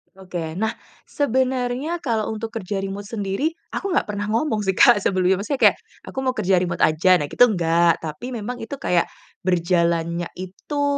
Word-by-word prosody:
Oke, 175 -4 -6
nah 220 +3 0 0.3
sebenarnya 260 +3 -1
kalau 225 -7 -1
untuk 220 +1 -5
kerja 195 -2 -3
remote 195 +1 -4
sendiri, 205 +7 -2 0.2
aku 395 - -2
nggak - - +1
pernah 205 -1 -3
ngomong 225 -2 0
sih 190 - +2
Kak, 240 -6 +6
sebelumnya. 185 0 +2
Maksudnya 270 +6 -2
kayak, - - +2 0.3
"Aku 265 - -4
mau 255 - +2
kerja 195 -5 +1
remote 175 -2 -2
aja," 175 +4 +4
nah 145 - -2
itu 245 - +4
enggak. 170 -6 +3
Tapi 160 +11 -6
memang 240 +1 -4
itu 225 - -5
kayak, 175 -1 +2 0.4
berjalannya 170 -1 +1
itu, 195 +11 -4
200 Hz, 170 wpm, -22 LUFS, 175-245 Hz, 0.4 s, Kak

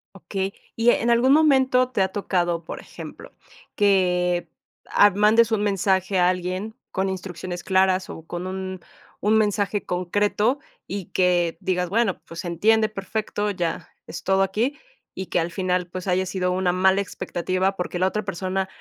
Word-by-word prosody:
Okey, 195 +1 -4 0.2
y 230 +1 +3
en 240 0 +2
algún 235 +3 +4
momento 265 -4 +4
te 230 - -1
ha 190 - +2
tocado, 175 -4 -1
por - - -7
ejemplo, - - -10 0.4
que, 180 -4 +2 0.4
ah, 205 - +6
mandes 215 +3 +4
un 210 -1 +1
mensaje 190 -1 +1
a 180 - +5
alguien 185 +4 -2 0.2
con 190 +1 -1
instrucciones 180 -1 -5
claras 190 0 +2
o 160 - -9
con 175 +2 -5
un 190 -1 -5 0.4
un 215 +1 +4
mensaje 205 -1 0
concreto, 205 +7 +1 0.3
y 195 -2 -4
que 175 -2 +2
digas: 180 -1 -1
"Bueno, 220 -1 +1
pues 165 - -9
se 175 - -6
entiende 215 +5 +3
perfecto, 210 0 -3
ya 170 -3 -3 0.2
es - - -7
todo 190 0 +2
aquí", 220 +9 0 0.4
y 190 0 -6
que - - +1
al 170 +1 -2
final, 180 0 0
pues 185 +2 -7
haya 185 +1 +1
sido 180 0 -1
una 180 0 +1
mala 190 +2 +3
expectativa, 185 0 -2
porque 180 -1 -3
la 185 - +3
otra 210 +2 -2
persona 190 0 -2
190 Hz, 165 wpm, -23 LUFS, 180-205 Hz, 0.4 s, ah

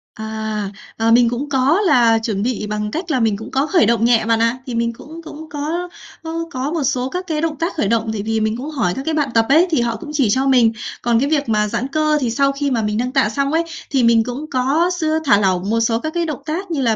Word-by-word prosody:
À, 220 -2 -4 0.3
ờ, 225 0 +2
mình 235 0 +5
cũng 250 +5 -4
có 280 +7 +2
là 240 - +4
chuẩn 215 -3 -2
bị 230 -3 -2
bằng 210 0 -3
cách 335 +4 -4
là 260 - +1
mình 220 -3 +1
cũng 220 - -9
có 270 +2 +1
khởi 345 0 +3
động 230 -1 +2
nhẹ 235 -2 +3
bạn 225 0 +2
ạ. 230 +2 +1
Thì 250 -3 -5
mình 235 0 0
cũng 315 +7 -11
cũng 315 0 -10
có 310 +5 -3 0.4
có 330 +1 -3
có 265 +2 -3
một 325 -3 -1
số 260 -1 0
các 365 +5 -5
cái 310 -3 -1
động 325 -1 -1
tác 335 +2 -1
khởi 295 - 0
động 225 +1 0
tại 210 - -3
vì 225 +1 -1
mình 220 +1 -1
cũng 270 +5 -6
hỏi 240 - -1
các - - -4
cái 320 - -1
bạn 295 -3 0
tập 225 0 +3
ấy, 320 +6 +5
thì 305 - +2
họ 235 -1 -1
cũng 320 +2 -9
chỉ 275 -7 +2
cho 260 +6 +1
mình, 245 -4 +4 0.3
còn 235 -1 +2
cái 280 +3 0
việc 290 -5 0
mà 210 -1 +2
giãn 240 +5 -2
cơ 305 +2 +1
thì 250 - 0
sau 275 +3 +2
khi 280 0 -2
mà 235 -3 +1
mình 210 0 -1
nâng 250 +2 -1
tạ 265 -5 +2
xong 275 +5 -1
ấy, 330 +1 +2 0.3
thì 270 -4 +2
mình 230 -1 +4
cũng 250 +5 -5
có 280 +7 +2
x - - -3 0.2
thả 205 -7 +5
lỏng 190 -1 0
một 230 +1 +1
số 230 0 +1
các 315 +5 -4
cái 345 -1 0
động 305 -4 -5
tác 345 +4 -4
như 300 -4 -1
là 230 -3 +2
255 Hz, 285 wpm, -19 LUFS, 225-305 Hz, 0.4 s, mình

